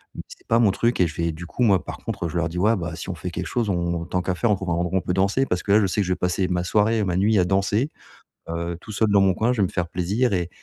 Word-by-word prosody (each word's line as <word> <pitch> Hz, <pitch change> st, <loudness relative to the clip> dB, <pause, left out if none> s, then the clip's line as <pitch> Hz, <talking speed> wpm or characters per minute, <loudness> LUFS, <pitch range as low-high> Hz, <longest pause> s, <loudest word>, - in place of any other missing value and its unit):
mais -, -, -5 dB
c'est -, -, -15 dB
pas 115 Hz, -, +3 dB
mon 110 Hz, -4 st, +4 dB
truc 115 Hz, +2 st, 0 dB
et 90 Hz, -, +4 dB
je 80 Hz, -, -8 dB
vais, 85 Hz, 0 st, 0 dB
du 80 Hz, +3 st, -8 dB
coup, 125 Hz, -, -6 dB
moi 100 Hz, -6 st, +3 dB
par -, -, -7 dB
contre, 85 Hz, -, -4 dB
je 80 Hz, -, -4 dB
leur 85 Hz, -1 st, +1 dB
dis: 85 Hz, -, -6 dB
«Ouais, 110 Hz, +5 st, +3 dB
bah, 85 Hz, -2 st, -4 dB
si 85 Hz, -, -7 dB
on 95 Hz, -, -3 dB
fait 90 Hz, +2 st, -6 dB
quelque -, -, -4 dB
chose 120 Hz, -4 st, -1 dB
on 85 Hz, -2 st, -1 dB
tant 90 Hz, +1 st, -1 dB
qu'à 95 Hz, +1 st, -1 dB
faire 120 Hz, +6 st, 0 dB
on -, -, +4 dB
trouve 95 Hz, -1 st, -5 dB
un -, -, +1 dB
endroit 85 Hz, +2 st, -1 dB
où -, -, +4 dB
on -, -, 0 dB
peut 90 Hz, -, -2 dB
danser» 100 Hz, +8 st, +2 dB
parce 90 Hz, 0 st, -1 dB
que 100 Hz, -, -1 dB
là 105 Hz, -, +6 dB
je -, -, +2 dB
sais 100 Hz, +3 st, 0 dB
que 95 Hz, -, -1 dB
je 90 Hz, -, +1 dB
vais -, -, -2 dB
passer 90 Hz, +1 st, 0 dB
ma 90 Hz, -1 st, -1 dB
soirée, 105 Hz, +4 st, +2 dB
ma 90 Hz, -3 st, -1 dB
nuit 105 Hz, +3 st, +3 dB
à -, -, +4 dB
danser, 100 Hz, -, +1 dB, 0.6 s
heu, 85 Hz, +1 st, -3 dB
tout 110 Hz, -, -9 dB
seul 110 Hz, +1 st, +1 dB
dans 100 Hz, -1 st, +5 dB
mon 95 Hz, -1 st, +3 dB
coin, 115 Hz, +6 st, +1 dB
je 120 Hz, -, -1 dB
vais -, -, +3 dB
me -, -, -7 dB
faire 90 Hz, -2 st, -2 dB
plaisir 100 Hz, +8 st, 0 dB
et 90 Hz, -3 st, 0 dB
95 Hz, 350 wpm, -23 LUFS, 85-105 Hz, 0.6 s, là